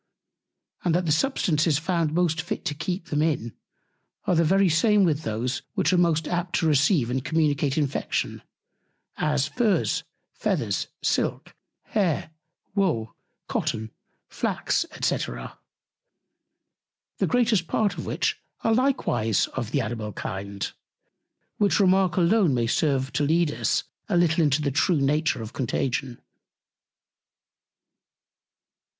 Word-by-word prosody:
and 170 -2 +2
that 180 0 +1
the 155 - +1
Substances 155 - +2
found 165 -1 0
most 165 -1 +1
fit 165 - -5
to 150 - -1
keep 170 +4 -4
them 150 0 0
in, 145 -8 0 0.7
are - - +2
the 165 0 +4
very 195 +4 +4
same 205 +5 +4
with 155 -4 +1
those 125 +2 -2
which 190 -2 +2
are - - +4
most 165 -2 +2
apt 175 0 -2
to 165 - +1
receive 145 - +3
and 130 0 -1
communicate 145 -3 +1
Infection, 145 -3 -1 0.8
as, 150 -3 +1
Furrs, 225 -6 +1 0.3
Feathers, - - -1 0.2
Silk, - - -1 0.3
Hair, 180 -7 -1 0.4
Wool, 165 - 0 0.3
Cotton, 110 0 -2 0.4
Flax, - - -1
&c. - - +2
the - - -5 1.8
greatest 230 -8 +2
Part 210 +3 +1
of - - -5
which - - -1 0.2
are 225 - +2
likewise 170 - +1
of 120 -5 -3
the 140 +3 +1
Animal 110 -2 -4
Kind; 100 +1 -5 0.9
which 205 0 +3
Remark 190 -2 +3
alone 180 - +3
may 120 -1 +1
serve 135 +1 0
to 150 - +1
lead 160 +1 +2
Us 115 -1 0 0.3
a 185 - +2
little 170 -1 +3
into 145 0 +2
the 140 - 0
true 150 +4 +2
Nature 145 -3 +1
of 110 - -8
Contagion. 125 0 -2
155 Hz, 130 wpm, -25 LUFS, 130-180 Hz, 1.8 s, the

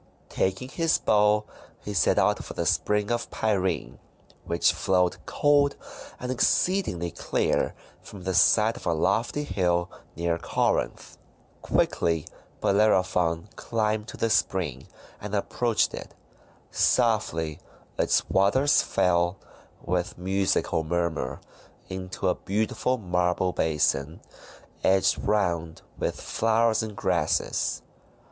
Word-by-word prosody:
Taking 95 +7 -1
his 165 +3 +1
bow 105 0 +3 0.4
he 105 - -4
set 85 -6 +2
out - - +2
for - - -9
the - - -2
Spring 105 +1 +1
of 120 0 -2
Pirene, 95 - -1 0.5
which 85 0 +2
flowed 90 -2 +1
cold 145 -1 +3 0.4
and 125 +1 -4
exceedingly 130 - +1
clear - - -1 0.3
from 95 -3 -11
the 95 0 -2
side 110 +5 +4
of - - -8
a 85 - +2
lofty 120 - 0
hill 90 -6 0 0.2
near 85 0 -1
Corinth. - - -1 0.4
Quickly 80 -3 0 0.4
Bellerophon 95 -4 +2
climbed 110 -1 -1
to - - -9
the 115 - 0
spring, 85 - 0 0.3
and 105 0 -4
approached 115 +3 0
it. - - -8 0.6
Softly 105 -10 +1 0.4
its - - +2
waters 130 +9 +3
fell, 85 +1 +1 0.5
with 90 0 -2
musical 95 -2 0
murmur, 80 -5 -2 0.5
into 95 -1 -4
a - - +3
beautiful 110 +5 -1
marble 90 -2 0
basin, 75 -1 0 0.6
edged 95 0 +3
round 85 -6 -1 0.2
with - - -2
flowers 115 0 +1
and 110 -2 -6
grasses. 90 -7 0
95 Hz, 110 wpm, -26 LUFS, 85-110 Hz, 0.6 s, side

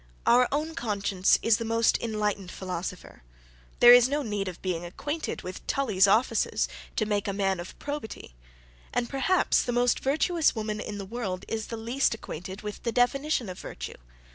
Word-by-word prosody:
Our 245 +1 +5
own 305 +3 -1
conscience 200 - +1
is 230 -1 +4
the 230 - -4
most 230 0 +2
enlightened 210 -4 -2
philosopher. 185 -1 -6 0.6
There 240 0 +11
is 245 +1 +7
no 290 +1 0
need 205 -4 -2
of 180 -2 -6
being 175 -3 -2
acquainted 290 - -4
with 185 +1 -8
Tully's 210 -8 +3
offices, 225 +6 +2 0.3
to 215 - +1
make 205 -1 -1
a 200 - -1
man 195 -2 0
of 175 - -8
probity: 285 - -6 0.6
and 245 -1 0
perhaps 275 +9 +2
the 245 - -2
most 245 0 +2
virtuous 315 +4 +2
woman 215 -1 -3
in 210 -1 -5
the 200 - -5
world 195 -4 -4
is 220 -1 -3
the 230 - -5
least 235 +3 0
acquainted 190 -1 -8
with 210 0 -6
the 235 - -1
definition 250 +1 +1
of 185 -1 -7
virtue. - - -7
220 Hz, 175 wpm, -27 LUFS, 195-245 Hz, 0.6 s, There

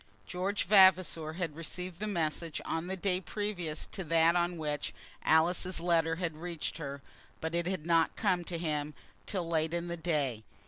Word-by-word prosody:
George 190 - -1
Vavasor 185 -5 +5
had 165 -3 -3
received 175 +2 -5
the 215 - -2
message 165 -4 -1
on 165 +2 -2
the 190 +1 -3
day 185 0 0
previous 185 -7 -3
to 190 - -4
that 165 +1 +4
on 175 0 +1
which 150 -9 -3 0.3
Alice's 170 +3 +3
letter 165 -1 +2
had 165 -3 -3
reached 170 -1 -4
her, 140 -2 -6 0.4
but 160 +1 -3
it 170 0 0
had 185 -4 -2
not 165 -1 +3
come 185 -5 +1
to 170 - -3
him 150 -3 -2 0.3
till 180 -4 -2
late 160 0 +1
in 170 0 -3
the 170 - -3
day. 145 -9 -1
170 Hz, 175 wpm, -31 LUFS, 160-180 Hz, 0.4 s, Vavasor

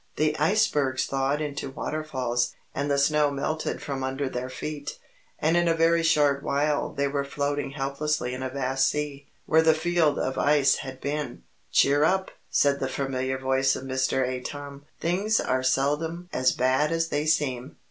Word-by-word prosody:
The 155 0 +1
icebergs 150 -7 +2
thawed 135 +2 0
into 145 -2 -4
waterfalls, 130 -5 -2 0.2
and 140 +1 -2
the 140 - +2
snow 150 +1 +3
melted 155 +3 -3
from 135 -2 -3
under 135 +1 -2
their 125 0 -4
feet, 145 +2 -6 0.4
and 160 +2 +1
in 175 0 +3
a 165 - +3
very 165 +1 +3
short 150 -4 +3
while 145 +1 0
they 140 0 0
were 140 0 -1
floating 145 +1 -2
helplessly 140 -2 -2
in 130 - -5
a 130 - -2
vast 135 0 +1
sea, 145 -1 -4 0.2
where 160 +1 +4
the 160 -1 +4
field 160 -2 +2
of 130 - -2
ice 145 -1 +4
had 130 -1 -8
been. 140 - -4 0.3
"Cheer 145 +2 +4
up!" 190 +4 +1 0.2
said 140 -1 +2
the 135 - -2
familiar 130 -1 -2
voice 135 0 +1
of - - -6
Mr. 130 0 0
Atom. 140 +2 -6
"Things 195 +6 +1
are 130 0 0
seldom 150 +7 0
as 130 0 +3
bad 130 +4 +1
as 165 0 0
they 145 +1 -1
seem. 135 -4 0
140 Hz, 170 wpm, -26 LUFS, 130-155 Hz, 0.4 s, where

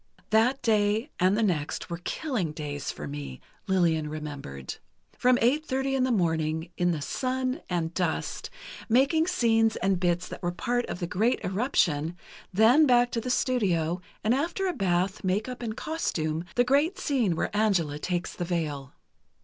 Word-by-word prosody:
"That 240 +5 +3
day, 215 +4 +2
and 185 +3 +3
the 225 - +2
next, 170 -2 -1
were 170 - -3
killing 225 - -2
days 145 -2 -5
for 75 - -5
me." 70 -2 -6 0.3
Lillian 165 -5 +2
remembered. 145 - -6 0.4
"From 250 0 +4
eight 275 +6 +3
thirty 270 -2 -1
in 260 -1 +2
the 260 - 0
morning, 160 -4 0
in 175 0 +1
the 155 -4 -1
sun 255 - -2
and 170 -2 -1
dust, 175 -3 -2 0.4
making 280 +8 +3
scenes 225 -10 +3
and 190 -2 +1
bits 175 0 0
that - - -8
were 175 - 0
a 175 - -6
part 245 +5 -1
of 180 - -5
the - - 0
great 215 +8 +1
eruption; 180 - +1 0.3
then 230 +10 +5
back 245 -1 +4
to 230 - -1
the 250 - -4
studio, 180 -10 +1 0.2
and 220 - +3
after 335 +8 -1
a 365 - 0
bath, 190 - 0
make 195 +4 0
up 250 -1 -6
and 225 -1 -4
costume, 165 - -2
the 245 - +4
great 285 +8 +2
scene 240 - +1
where 205 - -2
Angela 180 -9 +1
takes 175 +2 -2
the 175 - -4
veil. 150 -6 -3
195 Hz, 175 wpm, -27 LUFS, 165-250 Hz, 0.4 s, then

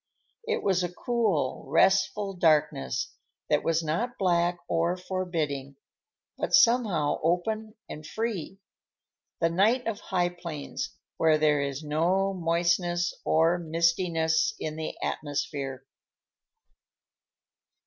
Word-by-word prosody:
It 460 - -1
was 190 -2 +2
a 175 -1 -2
cool, 185 - -1
restful 195 +6 +2
darkness 155 - +1 0.4
that - - +3
was 165 0 +1
not 220 +11 -2
black 175 -2 +2
or 170 +2 +1
forbidding, 165 -7 -3 0.6
but - - +2
somehow 215 -11 +3
open 215 +7 -1
and 155 - -8
free; 200 0 -4 0.8
the 165 - +3
night 220 +8 +3
of 225 -3 -2
high 180 -2 0
plains 170 -5 -6 0.2
where 160 -1 +4
there 150 -1 +3
is 140 +1 -3
no 175 +6 +1
moistness 175 0 +1
or 165 +2 +3
mistiness 165 -1 +1
in 155 -1 -4
the 160 0 -5
atmosphere. 140 -3 -3
170 Hz, 105 wpm, -27 LUFS, 155-190 Hz, 0.8 s, where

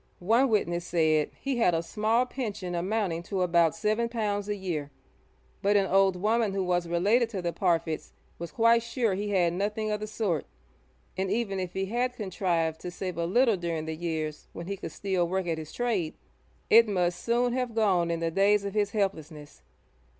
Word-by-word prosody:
One 230 +9 +3
witness 175 -6 0
said 155 -3 +2
he 275 -2 -2
had 180 -8 +3
a 165 - -1
small 220 +7 +1
pension 210 -8 -4
amounting 180 -1 -1
to 185 +1 -2
about 170 -2 +3
seven 215 +2 0
pounds 210 -3 -2
a 210 - 0
year, 170 -7 -4 0.7
but 205 +1 +3
an 195 - +3
old 195 0 +3
woman 215 +2 +1
who 195 - 0
was 175 -1 0
related 210 +8 +2
to 200 -5 -4
the 170 -1 -1
Parfitts 165 -4 0 0.3
'was 170 0 -6
quite 230 0 +4
sure 235 -2 -1
he 205 +2 -2
had 180 -4 +2
nothing 210 +3 -2
of 210 - -1
the 215 - -5
sort,' 205 -8 -2 0.7
and 190 +1 -1
even 200 -2 -1
if 185 -1 -4
he 190 0 -1
had 245 +4 -1
contrived 175 -6 -1
to 180 - -5
save 180 0 -5
a 170 - 0
little 230 +2 +3
during 165 -3 -3
the 160 0 -4
years 155 -2 -4
when 170 - -7
he 200 +2 -3
could 195 - -7
still 185 -3 -1
work 190 +1 -1
at 165 -2 -2
his 155 -1 -8
trade, 215 -10 -1 0.5
it 230 0 +7
must 180 -3 0
soon 240 +1 +1
have 250 -3 -2
gone 190 -6 +2
in 170 0 -2
the 165 0 0
days 200 +3 +3
of 200 - -3
his 210 -1 +1
helplessness. 160 -8 -3
195 Hz, 195 wpm, -28 LUFS, 170-215 Hz, 0.7 s, it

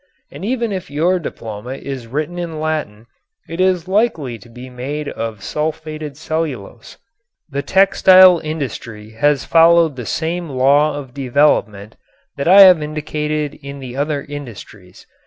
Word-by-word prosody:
And - - -10
even 235 0 -1
if 190 -2 -5
your 170 +6 +1
diploma 115 -5 -7
is 135 -3 -7
written 155 +8 -4
in 165 -3 -5
Latin 155 -9 -3 0.4
it 165 +3 -4
is 185 -2 +1
likely 175 - 0
to 120 - -17
be 125 +2 -11
made 135 +4 -5
of 110 -2 -5
sulfated 155 -1 -4
cellulose. 150 -9 -5 0.5
The 140 0 -2
textile 185 0 +6
industry 120 -8 -6
has 140 +5 +1
followed 165 -3 +4
the 125 - -6
same 170 +1 -3
law 140 +3 +2
of 135 -4 -9
development 125 -6 0 0.4
that 140 - -3
I 195 +3 +8
have 185 -4 +8
indicated 150 0 -3
in 140 0 -8
the 130 -2 -8
other 145 0 -2
industries. 110 -9 -10
150 Hz, 140 wpm, -18 LUFS, 125-165 Hz, 0.5 s, I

